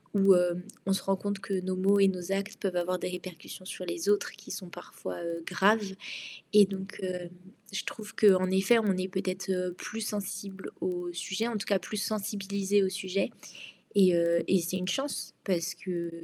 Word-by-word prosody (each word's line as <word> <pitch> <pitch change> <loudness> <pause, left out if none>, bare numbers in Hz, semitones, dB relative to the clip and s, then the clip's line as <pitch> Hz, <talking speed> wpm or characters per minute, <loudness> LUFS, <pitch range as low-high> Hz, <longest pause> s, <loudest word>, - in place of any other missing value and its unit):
où, 195 -1 +7
hem, 180 0 +2 0.2
on 195 - +3
se 195 - -1
rend 195 - +2
compte 200 0 -2
que 195 -1 -2
nos 185 0 -1
mots 195 +2 +4
et 195 - +7
nos 185 0 -2
actes 200 +2 -1
peuvent 190 -3 -1
avoir 180 +1 0
des - - -2
répercussions 180 0 -8
sur 185 0 -6
les 170 +1 -3
autres 205 0 +3
qui 205 +1 -14
sont 185 - -5
parfois, 175 - -7
heu, 170 0 -3
graves. 205 0 +3 0.6
Et 210 -1 +9
donc 195 +1 -6
heu, 180 -1 -3 0.5
je 195 - -1
trouve 215 -1 -7
qu'en 185 -3 +6
effet, 195 +5 +5
on 205 -4 +2
est 185 +1 -1
peut-être, 190 0 -2
heu, 180 -1 0
plus 215 +5 -6
sensibles 200 -2 -4
au 175 -1 -2
sujet, 190 +5 -2
en 235 -2 -1
tout 200 - -4
cas 200 -2 +3
plus 210 +4 -5
sensibilisés 200 -1 0
au - - +3
sujet. 190 0 -1 0.7
Et 185 -3 +7
heu 170 0 +3
et 190 - +5
c'est 175 +2 -2
une 180 - -3
chance 270 +8 -2
parce 185 -2 0
que 175 -1 -3
190 Hz, 200 wpm, -30 LUFS, 180-200 Hz, 0.7 s, Et